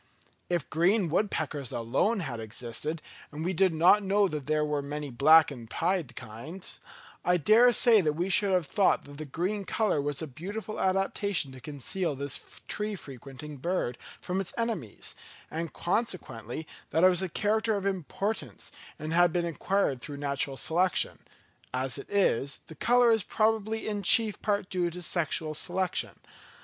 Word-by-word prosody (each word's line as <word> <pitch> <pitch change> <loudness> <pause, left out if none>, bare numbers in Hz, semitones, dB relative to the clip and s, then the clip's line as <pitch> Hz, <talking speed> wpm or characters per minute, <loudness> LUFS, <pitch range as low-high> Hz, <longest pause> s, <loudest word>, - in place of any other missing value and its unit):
If 175 -4 0
green 180 +3 +3
woodpeckers 155 - -1
alone 135 - +1
had 130 -8 -4
existed, 120 +8 -4 0.3
and 155 +2 -5
we 185 - 0
did 185 +1 +3
not 175 +6 +5
know 200 +1 +3
that 150 -5 -5
there 155 0 +2
were 150 -1 -1
many 145 0 -5
black 155 +5 +6
and 120 -5 -9
pied 170 -7 -1
kinds, 135 - -9 0.4
I 180 0 +3
dare 220 - +6
say 230 -2 +5
that 155 -4 +1
we 170 +4 -1
should 200 +1 +3
have 180 -3 +2
thought 195 +7 +2
that 145 +1 -12
the 155 - -5
green 185 +8 -2
colour 210 -6 +1
was 145 0 -2
a 160 - -2
beautiful 200 - -6
adaptation 195 -4 0
to 130 -1 -11
conceal 150 +4 -3
this 140 0 -1 0.3
tree 210 0 -2
frequenting 140 - -9
bird 135 -5 -2 0.2
from 185 +2 -2
its 190 - -4
enemies; 225 - -3 0.4
and 165 0 -3
consequently 160 - -2 0.2
that 165 - +1
it 185 - +9
was 180 -1 +1
a 190 - -2
character 215 +4 +1
of 200 -1 -3
importance, 195 +3 -3 0.3
and 155 +1 -4
had 175 0 +5
been 175 0 0
acquired 170 -5 0
through 145 +2 -6
natural 140 -1 -2
selection; 175 +5 +1 0.6
as 130 +1 -1
it - - -10
is, 140 - +1
the - - -11
colour 240 - +4
is 225 -1 +3
probably 220 +2 0
in 205 -1 -2
chief 215 +2 +4
part 200 -2 0
due 180 -2 0
to 180 +1 -8
sexual 160 -2 -1
selection. 180 +3 -1
170 Hz, 165 wpm, -29 LUFS, 145-200 Hz, 0.6 s, it